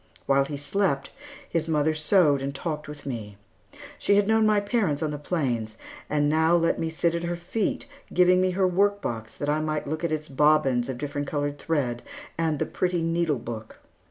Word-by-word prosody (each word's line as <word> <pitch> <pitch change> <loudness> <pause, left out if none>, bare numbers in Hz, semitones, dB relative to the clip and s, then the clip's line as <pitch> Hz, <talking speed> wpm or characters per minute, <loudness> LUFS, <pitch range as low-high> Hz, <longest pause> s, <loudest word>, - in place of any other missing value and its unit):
While 135 0 +3
he 145 0 -5
slept, 145 -1 -1 0.4
his 165 -1 -1
mother 155 -1 +2
sewed 155 -3 +3
and 140 +1 -3
talked 155 -1 -4
with 150 -1 -9
me. 110 -6 -5 0.6
She 200 - +3
had 205 0 +3
known 220 0 +4
my 210 -1 +4
parents 200 - 0
on 155 - -1
the 145 - -5
plains, 120 -9 -2 0.3
and 145 -1 +2
now 160 +3 +3
let 165 -1 +2
me 165 - -1
sit 165 +1 0
at 170 - -1
her 170 0 -2
feet, 180 +9 -2 0.3
giving 180 0 +5
me 185 - +2
her 190 -1 +4
workbox, 180 - 0
that 145 - -3
I 150 +1 +1
might 155 -1 -2
look 155 +3 -4
at 170 - 0
its 155 0 -2
bobbins 135 -3 +3
of 130 - -3
different 145 +1 -4
colored 145 -1 -2
thread 130 -7 -1 0.3
and 160 -2 0
the - - 0
pretty 180 -2 -1
needle 165 -3 +1
book. 110 -2 -7
155 Hz, 195 wpm, -26 LUFS, 140-175 Hz, 0.6 s, giving